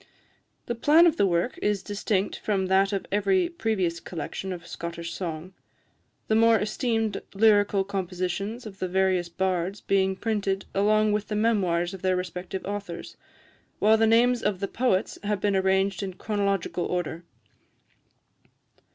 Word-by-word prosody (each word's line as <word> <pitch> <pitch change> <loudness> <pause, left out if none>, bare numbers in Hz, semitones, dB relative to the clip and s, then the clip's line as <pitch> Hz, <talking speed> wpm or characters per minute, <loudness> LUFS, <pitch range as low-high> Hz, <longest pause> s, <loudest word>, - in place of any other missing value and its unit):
The 240 - -2
plan 300 +8 +5
of 335 -1 +3
the 200 - +3
work 175 +6 0
is 205 -2 0
distinct 205 -1 -1
from 195 -3 0
that 190 +1 +3
of 195 -2 -2
every 345 - +2
previous 205 - -1
collection 185 +3 -6
of 175 -2 -7
Scottish 170 0 -6
song 170 0 -5 0.7
the - - +1
more 225 +1 +5
esteemed 225 0 -1
lyrical 205 -2 +4
compositions 195 +4 -3
of 200 -2 -10
the 185 - -1
various 185 -1 +1
bards 185 +2 -1
being 190 -1 +1
printed 200 -2 -1
along 215 +2 +3
with 210 0 -1
the 210 - -3
memoirs 190 -5 +1
of 190 - -8
the 185 -1 +1
respective 180 +1 -5
authors, 200 -4 -6 0.6
while 215 +1 +5
the 225 0 +3
names 240 +2 +4
of 205 -4 -1
the 195 - -2
poets 235 -5 0
have 205 -1 -1
been 200 0 +1
arranged 190 0 +1
in 190 -2 -5
chronological 200 -4 -1
order. 175 -1 -3
195 Hz, 150 wpm, -26 LUFS, 185-215 Hz, 0.7 s, plan